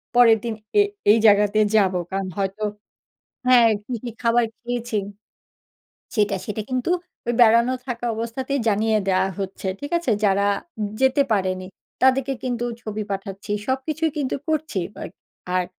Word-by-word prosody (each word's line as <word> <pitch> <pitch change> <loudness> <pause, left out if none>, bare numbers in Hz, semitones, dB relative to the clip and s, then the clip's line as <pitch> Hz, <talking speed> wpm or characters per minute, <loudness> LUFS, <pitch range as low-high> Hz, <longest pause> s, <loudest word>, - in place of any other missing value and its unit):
পরের 235 -2 +7
দিন 230 - -1 0.3
এ - - +8 0.3
এই 220 - +6
জায়গাতে 210 0 +5 0.2
যাবো।" 190 -4 +3
কারণ 195 0 -2
হয়তো 195 +2 -2 0.8
হ্যাঁ, 245 -2 +7 0.2
কি, 255 - -5
কি 245 - -4
খাবার 235 0 +3 0.2
খেয়েছি 240 -2 -3 1.2
সেটা। 210 -2 +2
সেটা 210 0 -3
কিন্তু 255 +5 -1 0.4
ওই 240 - +1
বেড়ানো 235 +2 +6
থাকা 240 -2 -4
অবস্থাতেই 255 +5 -3
জানিয়ে 220 +1 +2
দেওয়া 190 0 +2
হচ্ছে। 195 0 -5
ঠিক 285 - -6
আছে? 340 -7 -2
যারা 200 0 +3 0.5
যেতে 265 +1 +4
পারেনি, 185 -2 0 0.4
তাদেরকে 265 +1 +3
কিন্তু 240 -2 -2 0.2
ছবি 215 -1 -4
পাঠাচ্ছি। 195 +1 -5
সবকিছুই 305 +5 -1
কিন্তু 275 -3 -1
করছি। 310 -8 -1 0.2
বা - - -9 0.5
আর 185 0 +2
230 Hz, 140 wpm, -23 LUFS, 200-255 Hz, 1.2 s, এ